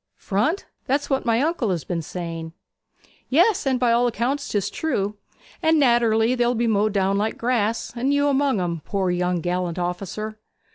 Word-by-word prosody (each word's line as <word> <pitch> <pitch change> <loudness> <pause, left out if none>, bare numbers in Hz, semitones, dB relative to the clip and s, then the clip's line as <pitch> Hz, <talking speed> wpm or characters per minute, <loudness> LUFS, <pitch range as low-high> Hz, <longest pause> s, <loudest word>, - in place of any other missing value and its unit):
'Front! 230 - -1 0.2
That's 285 +2 0
what 265 -2 0
my 230 +1 +3
uncle 310 -8 0
has 175 -4 -1
been 170 -2 -3
saying.' 165 -1 -6 0.8
'Yes, 345 - +3
and 260 -2 +2
by 245 -2 +3
all 240 +1 +3
accounts 245 +5 -1
'tis 205 -3 -1
true. 210 -10 -2 0.4
And 320 0 +3
naterelly 235 -2 +3
they'll 245 0 +1
be 235 +1 +1
mowed 215 -1 +2
down 195 0 +1
like 215 +2 -1
grass; 230 -2 0
and 255 +4 0
you 285 0 +2
among 275 -5 +2
'em, 170 -3 -2
poor 190 -3 -1
young 180 -1 0
galliant 180 -1 -1
officer!' 195 +5 -4
225 Hz, 175 wpm, -23 LUFS, 190-260 Hz, 0.8 s, my